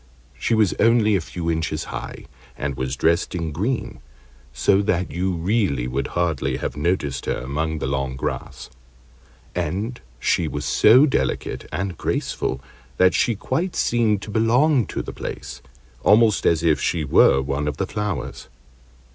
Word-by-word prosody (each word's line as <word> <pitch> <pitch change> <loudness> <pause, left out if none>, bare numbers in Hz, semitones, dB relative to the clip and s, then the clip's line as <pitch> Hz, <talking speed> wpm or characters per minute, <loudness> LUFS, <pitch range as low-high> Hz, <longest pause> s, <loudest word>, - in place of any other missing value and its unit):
She 115 - 0
was 110 -4 +3
only 115 -2 +4
a 95 - +1
few 85 +1 -3
inches 80 -1 -2
high, - - -7 0.3
and 70 -1 -3
was 65 0 -3
dressed 85 +6 +1
in 85 -2 -2
green, 105 - -2 0.5
so 75 +9 +2
that 90 -3 0
you 95 +2 -1
really 85 - 0
would 65 +2 -2
hardly 85 -2 0
have - - -4
noticed 75 -4 -1
her - - 0
among 75 +5 -2
the - - -3
long 65 -1 -2
grass; 65 - -5 0.8
and 105 +10 -3 0.2
she 85 - +1
was 70 0 -4
so 115 - +6
delicate 140 - -2
and 90 -3 -3
graceful 65 - -2 0.4
that 95 0 +5
she 120 - +2
quite 175 - -2
seemed 110 -4 +1
to 105 - -7
belong 120 - +3
to - - -4
the - - -7
place, 65 0 -7 0.4
almost 110 - +4
as 85 -1 +2
if 80 -3 +2
she 80 - 0
were 65 -1 +5
one 70 +2 -2
of 75 -1 -2
the 95 - -1
flowers. 95 -12 -4
85 Hz, 155 wpm, -22 LUFS, 70-105 Hz, 0.8 s, so